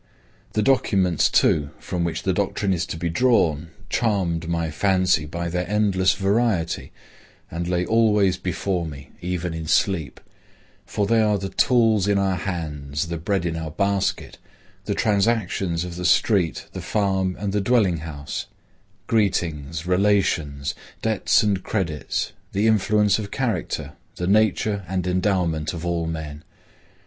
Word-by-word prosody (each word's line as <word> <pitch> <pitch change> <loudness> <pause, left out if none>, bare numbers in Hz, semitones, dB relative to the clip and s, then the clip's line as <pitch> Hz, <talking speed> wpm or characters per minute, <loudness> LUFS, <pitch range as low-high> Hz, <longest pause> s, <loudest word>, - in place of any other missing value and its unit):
The 110 - +1
documents 95 - +2
too 70 -2 +3
from 90 -1 -3
which 85 -1 -2
the - - +1
doctrine 100 -2 0
is 85 -1 -2
to 80 - -5
be 85 - -2
drawn, 85 - +2 0.2
charmed 90 -9 0
my 85 -2 -1
fancy 90 -3 +2
by 85 +2 -4
their 90 +1 -2
endless 100 -3 +2
variety, 100 -4 0 0.6
and 85 +1 -3
lay 90 0 0
always 105 -4 +3
before 90 -1 -2
me, 70 -2 -10
even 90 -1 -3
in 80 -1 -5
sleep; 85 - +1 0.7
for 105 - -1
they 115 +2 +3
are 105 -1 +2
the 95 0 -4
tools 115 -6 +3
in 100 -1 +3
our 95 -1 +1
hands, 80 -5 -4
the 85 -1 -3
bread 95 +1 -1
in 85 -1 -1
our 80 -1 -4
basket, 100 +4 -1 0.5
the - - -1
transactions 100 -5 +1
of 90 -1 -7
the 90 - -4
street, 95 -6 +2
the - - -5
farm 95 -3 0
and 100 -1 -2
the 105 - +1
dwelling 100 -5 +2
house; 75 -3 -6 0.6
greetings, 85 -8 0
relations, 90 -7 +1 0.3
debts 110 +1 +2
and 100 -3 +1
credits, 85 -8 -2 0.2
the 100 +3 +1
influence 105 -1 +3
of 100 -2 -5
character, 125 -3 -2 0.2
the 90 - -3
nature 105 0 +2
and 90 0 -2
endowment 90 -4 0
of 85 0 -6
all 85 -1 -1
men. 80 -2 -6
90 Hz, 145 wpm, -23 LUFS, 85-105 Hz, 0.7 s, too